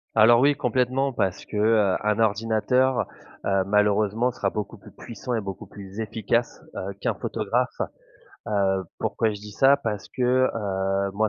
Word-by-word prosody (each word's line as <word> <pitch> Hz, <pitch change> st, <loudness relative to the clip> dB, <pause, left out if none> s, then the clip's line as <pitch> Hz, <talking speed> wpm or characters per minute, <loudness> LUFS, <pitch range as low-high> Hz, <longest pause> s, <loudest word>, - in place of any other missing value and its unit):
Alors, 115 Hz, +2 st, +6 dB
oui, 145 Hz, +2 st, +5 dB
complètement 130 Hz, 0 st, 0 dB
parce 95 Hz, -6 st, -1 dB
que, 105 Hz, -, -6 dB
heu, 105 Hz, -3 st, +3 dB
un 105 Hz, +1 st, +1 dB
ordinateur, 115 Hz, +4 st, +2 dB, 0.4 s
heu, 95 Hz, -1 st, +2 dB
malheureusement 105 Hz, +3 st, +2 dB
sera 100 Hz, -4 st, -2 dB
beaucoup 105 Hz, +2 st, -5 dB
plus 100 Hz, -, -15 dB
puissant 120 Hz, +2 st, -7 dB
et 115 Hz, -, 0 dB
beaucoup 95 Hz, -2 st, -7 dB
plus 100 Hz, +1 st, -10 dB
efficace, 110 Hz, +2 st, -1 dB
heu, 100 Hz, +1 st, -4 dB
qu'un -, -, 0 dB
photographe, -, -, -2 dB, 0.7 s
heu, 95 Hz, -2 st, +1 dB
pourquoi 115 Hz, -, 0 dB
je 105 Hz, -, -4 dB
dis 105 Hz, 0 st, -9 dB
ça? 135 Hz, +6 st, +5 dB
Parce 105 Hz, -6 st, -4 dB
que, 125 Hz, -, -4 dB, 0.3 s
heu, 95 Hz, -2 st, -1 dB
moi, 110 Hz, +2 st, +1 dB
105 Hz, 160 wpm, -25 LUFS, 100-115 Hz, 0.7 s, Alors